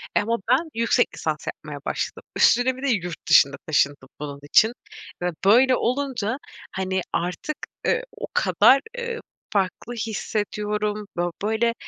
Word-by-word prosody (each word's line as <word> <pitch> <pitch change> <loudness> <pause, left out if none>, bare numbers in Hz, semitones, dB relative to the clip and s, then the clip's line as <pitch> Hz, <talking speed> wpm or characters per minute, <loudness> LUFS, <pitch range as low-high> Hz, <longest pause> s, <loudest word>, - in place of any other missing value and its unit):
eee - - +5
ama 230 +2 0
ben 275 +7 +3
yüksek 230 0 +3
lisans - - -3
yapmaya - - -6
başladım - - -3
üstüne 250 +1 +4
bir 260 - -9
de 280 - +1
yurt 180 - -1
dışına 135 0 +6
taşındım 140 -3 +1
bunun 145 -1 -6
için 215 +10 +5 0.5
ve 180 - +1 0.2
böyle 250 +6 +6
olunca, 255 -3 -1 0.4
hani, 190 0 -1
artık, 180 - -2 0.3
ııı, - - +2 0.2
o - - -4
kadar, 270 +1 +5 0.2
ııı, 470 -1 -3 0.3
farklı 200 +4 -1
hissediyorum. 210 -1 -2
Bö 175 0 +1
böyle 220 +2 +1
215 Hz, 140 wpm, -24 LUFS, 185-250 Hz, 0.5 s, dışına